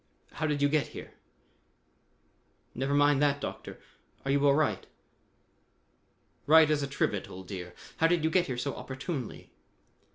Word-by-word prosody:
How 155 - -2
did 145 -1 0
you - - +5
get 150 0 +1
here?" - - -9 1.6
"Never 135 +3 -1
mind 145 -1 +4
that, 145 -1 +2
Doctor. - - -7 0.5
Are 135 - 0
you 140 +1 +3
all 140 - +5
right?" 155 -2 0 1.6
"Right 155 0 +7
as 150 -1 +1
a 140 - -2
trivet, 105 -7 -2
old 95 0 -10
dear. 90 -3 -7 0.2
How 165 - +4
did 170 -1 +1
you 160 - +1
get 180 +1 +2
here 130 -3 -3
so 135 +3 -2
opportunely?" 130 -1 -6
145 Hz, 155 wpm, -29 LUFS, 135-155 Hz, 1.6 s, Right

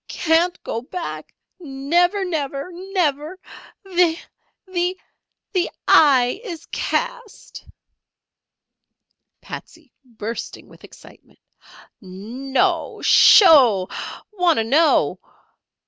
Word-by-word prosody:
"Can't 340 +2 0
go 230 - -4
back 335 +7 -7 0.3
again. 275 -5 -9
Never! 355 +5 +2
Never! 290 -2 -4
Never! 350 -3 -3 0.5
The 355 -4 +1 1.4
the 365 -2 0 0.2
eye 265 - +4
is 340 -8 -8
cast!" 485 -3 -4 1.8
Patsey 315 -6 -11
(bursting 230 -2 -8
with - - -19
excitement). - - -18 0.6
"No'o! 265 - -3
Sho'o! 250 - +6 0.4
Wanter 355 - +1
know." 300 +8 +2
320 Hz, 75 wpm, -20 LUFS, 265-360 Hz, 1.8 s, Sho'o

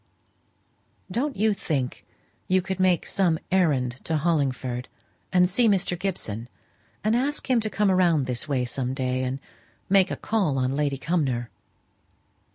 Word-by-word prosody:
"Don't 275 +4 -1
you 215 +1 +3
think 140 -9 -3 0.4
you 185 0 +2
could 190 0 -4
make 185 -2 +3
some 175 -5 +2
errand 140 -10 +2
to 160 - 0
Hollingford, 135 -6 -1 0.4
and 180 -1 +5
see 225 +6 +3
Mr. 190 -2 +2
Gibson, 125 - -4 0.5
and 215 +2 +2
ask 280 +4 0
him 245 - +4
to 220 -1 -2
come 210 -2 +2
round 170 -6 +3
this 125 +2 -2
way 130 -4 0
some 130 +1 -2
day, 130 -1 -1
and 130 +1 -2 0.5
make 195 -1 +5
a - - -2
call 195 -11 0
on 130 +1 0
Lady 145 -1 0
Cumnor?" 135 -7 -1
165 Hz, 150 wpm, -25 LUFS, 130-190 Hz, 0.5 s, and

